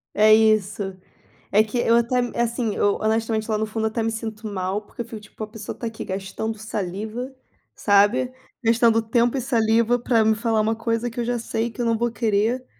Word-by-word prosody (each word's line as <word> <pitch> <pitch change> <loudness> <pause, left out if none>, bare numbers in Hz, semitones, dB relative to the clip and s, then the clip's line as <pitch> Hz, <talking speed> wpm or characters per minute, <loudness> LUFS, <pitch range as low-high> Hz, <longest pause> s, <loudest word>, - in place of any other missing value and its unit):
É 215 +1 +6
isso. 205 -3 +2 0.5
É 210 +2 +5
que 220 +3 -4
eu 230 -1 +3
até 235 +2 +2 0.2
assim, 235 -2 -1
eu 205 - +2
honestamente, 220 0 -1
lá 215 - +2
no 215 - 0
fundo, 220 +1 -2
até 225 +1 -2
me 225 0 0
sinto 220 -1 -5
mal, 195 0 -2
porque 210 - -9
eu 235 - -5
fico 230 -2 -8
tipo: 215 +1 -9
"A - - -5
pessoa 215 -1 -7
está - - -7
aqui 225 - -6
gastando 195 +3 -4
saliva", 215 +4 -4 0.4
sabe, 205 +5 +3 0.3
"gastando 230 0 +4
tempo 235 +3 +1
e - - -1
saliva 235 -1 +2
para 230 -2 +2
me 220 0 +4
falar 220 0 +1
uma 220 +1 +1
coisa 230 +1 -1
que 235 - -7
eu 235 - -1
já 245 0 0
sei 230 0 -2
que 240 +2 -6
eu - - 0
não 230 -1 +2
vou 240 +1 0
querer". 230 +3 0
225 Hz, 210 wpm, -23 LUFS, 215-235 Hz, 0.5 s, É